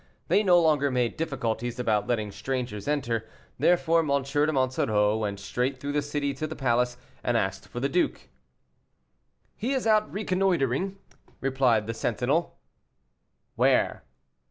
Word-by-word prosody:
They 205 - +4
no 180 -4 +5
longer 150 -4 +3
made 125 -2 0
difficulties 120 -6 -2
about 110 -4 0
letting 110 -4 -1
strangers 120 -1 -4
enter, 120 -6 -1 0.3
therefore 170 -1 +3
M. 160 - 0 0.2
de 145 +3 +1
Monsoreau 110 -6 +1
went 105 -3 -2
straight 125 +6 -2
through 145 - -4
the 145 0 +1
city 145 -1 -2
to 155 +3 -4
the 155 - -6
palace, 125 -2 +1 0.3
and 120 -1 +1
asked 95 -3 -2
for 120 - -6
the 135 - +1
duke. 175 +5 -1 1.3
"He 245 +6 -2
is 260 -3 -1
out 215 -1 +3
reconnoitering," 190 - 0 0.4
replied 130 -5 +2
the 115 - -3
sentinel. 125 +8 -1 1.0
"Where?" - - +2
135 Hz, 140 wpm, -27 LUFS, 115-155 Hz, 1.3 s, no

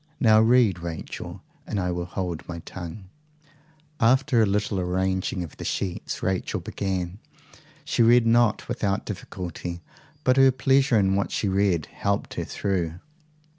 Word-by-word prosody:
Now 110 -2 +6
read, 115 -5 +4
Rachel, 85 -2 -7 0.2
and 100 - -2
I 90 -1 0
will 90 0 -3
hold 90 -3 -4
my 85 - -4
tongue." 90 +2 -7 1.0
After 130 +1 +4
a 110 - +4
little 105 0 0
arranging 95 0 -1
of 80 - -9
the - - -7
sheets, 90 -3 -3
Rachel 95 -1 -1
began. 95 -1 -3 0.7
She 140 - 0
read 120 +1 +6
not 115 -1 +3
without 105 -5 -1
difficulty, 90 -3 -6 0.4
but 130 -1 +3
her 135 0 +7
pleasure 135 -1 +3
in 95 -2 +3
what 100 0 0
she 105 - -1
read 95 -5 +1
helped 100 0 -2
her - - -3
through. 90 -5 -2
100 Hz, 145 wpm, -25 LUFS, 90-115 Hz, 1.0 s, her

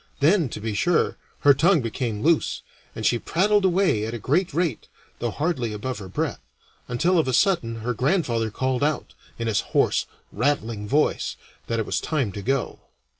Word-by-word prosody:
Then, 160 0 +3
to 110 - -6
be 110 0 -3
sure, 170 +11 +2 0.3
her 145 - +7
tongue 165 +4 +3
became 115 -2 -3
loose, 165 0 +2 0.3
and - - -4
she 120 - +3
prattled 205 - +2
away 185 - +2
at 115 - -4
a - - -3
great 160 - +1
rate, 160 -5 -1 0.3
though 120 - -1
hardly 130 -4 -1
above 125 +4 -4
her 95 - -8
breath, 150 - -2 0.5
until 170 +9 +2
of 155 - +1
a 130 - 0
sudden 120 - +2
her 125 +2 -1
grandfather 120 - +1
called 130 +4 -1
out, 150 +1 -1 0.2
in 115 - -3
his 110 -3 +1 0.2
hoarse, - - +2 0.2
rattling 115 -4 -1
voice, 150 +6 +1 0.3
that 115 - -1
it 110 - -1
was - - -1
time 140 -10 -1
to 100 - -6
go. 135 +4 -1
130 Hz, 180 wpm, -24 LUFS, 115-165 Hz, 0.5 s, her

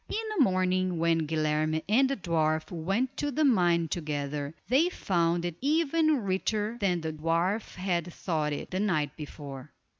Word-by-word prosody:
In - - -3 0.2
the 320 - +5
morning, 185 -3 +1
when 165 -1 +1
Guilerme 155 0 0
and 260 +6 +4
the 275 - 0
dwarf 160 -4 0
went 195 +11 -1
to 290 - -1
the 305 +3 +1
mine 175 - +3
together, 145 -2 -3
they 275 - +4
found 170 - 0
it 175 -2 -4
even 310 -1 +2
richer 210 +4 -1
than 180 -4 +1
the 160 0 -3
dwarf 165 +7 -1
had 175 -2 -1
thought 155 -4 -2
it, 145 - -5
the 185 - -1
night 155 -9 0
before. 145 -3 -9
175 Hz, 160 wpm, -29 LUFS, 155-210 Hz, 0.2 s, the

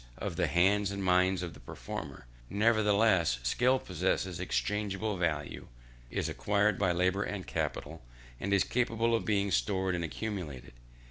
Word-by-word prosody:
of - - -4
the - - +1
hands 100 +3 +3
and 100 0 -4
mind 90 0 +3
of 85 -2 -5
the - - -14
performer; - - -7 0.2
nevertheless 105 - +3
skill 125 - +3
possesses 90 -3 -1
exchangeable 105 +2 -1
value, 80 -5 -2 0.4
is - - -2
acquired 105 -1 +1
by 95 -3 +2
labour 90 +3 +1
and 100 -3 -3
capital, - - -3 0.4
and 100 - -3
is 100 -1 +4
capable 115 -1 0
of 115 - +1
being 100 -2 +1
stored 95 -1 +1
and 90 -1 -1
accumulated. 85 - -5
100 Hz, 145 wpm, -31 LUFS, 90-105 Hz, 0.4 s, is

